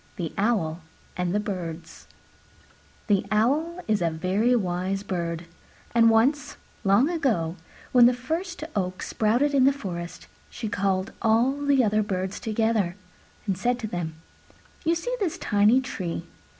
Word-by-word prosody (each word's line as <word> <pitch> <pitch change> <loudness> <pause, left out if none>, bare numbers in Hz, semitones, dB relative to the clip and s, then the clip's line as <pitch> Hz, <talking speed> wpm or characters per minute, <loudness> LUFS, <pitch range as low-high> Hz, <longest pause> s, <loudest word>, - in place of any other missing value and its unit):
THE 165 -3 -4
OWL 195 -6 0 0.3
AND 180 -1 -1
THE 205 - +1
BIRDS 170 -5 -6 1.0
The 205 -3 +2
Owl 290 +11 +1
is 215 -3 +1
a 170 - +2
very 190 +9 +1
wise 190 -1 -1
bird; 170 -3 -3 0.5
and 230 -1 +6
once, 255 +6 +2 0.3
long 200 +7 +4
ago, 235 - 0 0.4
when 245 -1 +7
the 250 - +4
first 325 +7 -4
oak 185 -2 -2
sprouted 240 +7 +1
in 265 -2 +5
the 275 - +6
forest, 175 -10 -6 0.2
she 225 - -5
called 195 -1 0
all 230 +4 +4
the 285 -2 +2
other 215 0 +2
Birds 190 -2 -3
together 220 -5 0 0.5
and 195 -3 0
said 240 +7 0
to 230 -3 -4
them, 175 -5 -4 0.7
"You 330 +1 +2
see - - -2
this 370 -7 -1
tiny 210 +5 +4
tree? 185 -9 -4
215 Hz, 145 wpm, -26 LUFS, 185-250 Hz, 1.0 s, when